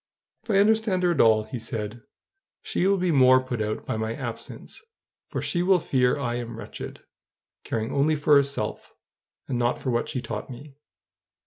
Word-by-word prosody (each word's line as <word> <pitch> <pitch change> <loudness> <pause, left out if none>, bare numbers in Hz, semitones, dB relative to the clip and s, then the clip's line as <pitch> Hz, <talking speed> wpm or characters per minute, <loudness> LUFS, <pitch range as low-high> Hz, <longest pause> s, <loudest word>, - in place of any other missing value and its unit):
"If 225 - -26
I 200 - +3
understand 210 -2 +3
her 175 - +4
at 170 - +3
all," 110 -1 +5
he 115 +3 -6
said, 110 0 -5 0.6
"she 185 - 0
will 200 0 +3
be 180 -1 +1
more 130 -3 +6
put 130 -3 -4
out 105 0 -3
by - - -2
my 110 +1 -2
absence; 120 -4 -7 0.5
for - - -4
she 175 - 0
will 185 0 +4
fear 130 -3 +1
I 120 -4 -2
am 120 -2 -6
wretched, - - -8 0.6
caring 115 +2 -3
only 150 +3 +2
for 145 0 +2
herself, 140 -1 0 0.5
and 125 -2 -2
not 120 0 +1
for 130 - -3
what 120 0 -1
she 130 - -2
taught 110 -2 -6
me. 135 +3 -10
130 Hz, 185 wpm, -25 LUFS, 115-155 Hz, 0.6 s, more